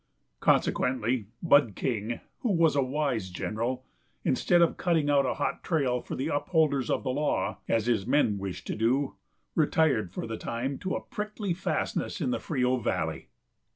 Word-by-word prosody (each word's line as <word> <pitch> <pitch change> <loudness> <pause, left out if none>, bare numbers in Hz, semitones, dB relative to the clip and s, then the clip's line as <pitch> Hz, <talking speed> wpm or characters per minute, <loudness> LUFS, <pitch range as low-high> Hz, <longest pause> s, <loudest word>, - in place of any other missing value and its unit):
Consequently, 125 -3 +1 0.2
Bud 145 - +5
King, 115 -2 -2 0.2
who 235 - 0
was 165 -4 +4
a 140 - +4
wise 130 -7 -1
general, 115 +8 -3 0.4
instead 175 - +3
of 170 -1 +4
cutting 160 -5 +1
out 140 -2 +4
a - - -1
hot - - -2
trail 135 -7 +1
for - - -6
the 130 - -2
upholders 145 -3 +1
of - - 0
the 130 - -1
law, 145 +3 0
as 115 -2 +1
his 115 -4 +1
men 125 -7 +3
wished 95 -2 -5
to - - -3
do, 130 +5 +1 0.4
retired 150 - +2
for - - -4
the 115 -1 -4
time 125 +4 -3
to 185 - -4
the - - -1
prickly 210 -2 -3
fastnesses 180 - -2
of - - 0
the 260 - 0
Frio 130 -4 +1
valley. 120 - -2
130 Hz, 170 wpm, -28 LUFS, 115-155 Hz, 0.4 s, Bud